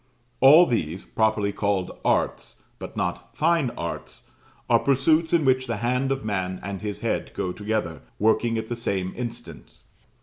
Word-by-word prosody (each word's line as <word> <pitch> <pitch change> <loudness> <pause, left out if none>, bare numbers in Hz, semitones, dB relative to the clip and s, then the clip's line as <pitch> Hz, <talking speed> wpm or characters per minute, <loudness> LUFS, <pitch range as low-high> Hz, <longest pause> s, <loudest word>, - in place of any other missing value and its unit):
All 150 +7 +8
these, 95 - -2
properly 110 -2 +1
called 100 -3 -1
Arts, - - -1 0.2
but - - -8
not - - -4
Fine 160 -4 +2
Arts, 85 0 -6 0.4
are - - +4
pursuits 155 +4 +2
in 165 -4 +3
which 130 0 +2
the 115 - -1
hand 125 +4 0
of 135 -5 -2
man 95 -3 -2
and 100 +1 -5
his 105 -1 -5
head - - -1
go 90 - -2
together, 105 -6 -3 0.2
working 115 +2 +2
at 110 0 -3
the 120 - -3
same 95 -5 -2
instant. 115 - -8
110 Hz, 160 wpm, -25 LUFS, 100-130 Hz, 0.4 s, All